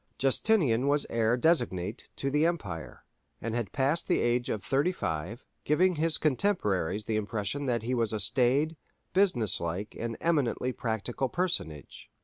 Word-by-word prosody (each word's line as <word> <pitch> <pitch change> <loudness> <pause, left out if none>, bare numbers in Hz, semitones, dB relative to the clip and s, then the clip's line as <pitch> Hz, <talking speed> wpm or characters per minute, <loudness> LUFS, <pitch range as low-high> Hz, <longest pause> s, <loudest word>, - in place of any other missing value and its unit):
Justinian 135 - +2
was 145 0 +3
heir 115 +1 +2
designate 115 - 0
to 135 - -2
the 150 +2 +2
empire, 105 - -3 0.3
and 115 0 -4
had 120 -2 -2
passed 140 +5 +1
the 180 - +2
age 120 +1 +1
of 105 - -2
thirty 140 +7 +1
five, 90 - -4 0.2
giving 180 +5 +3
his 160 +1 +2
contemporaries 105 - 0
the 110 - -1
impression 110 +6 -2
that 120 -3 0
he 125 +3 -2
was 115 -3 +1
a 110 - -2
staid, 135 +7 +2 0.4
business 175 - +3
like, 90 +5 -4
and 115 -1 -3
eminently 140 -6 0
practical 120 +2 -3
personage. 145 - -3
120 Hz, 150 wpm, -29 LUFS, 110-150 Hz, 0.4 s, was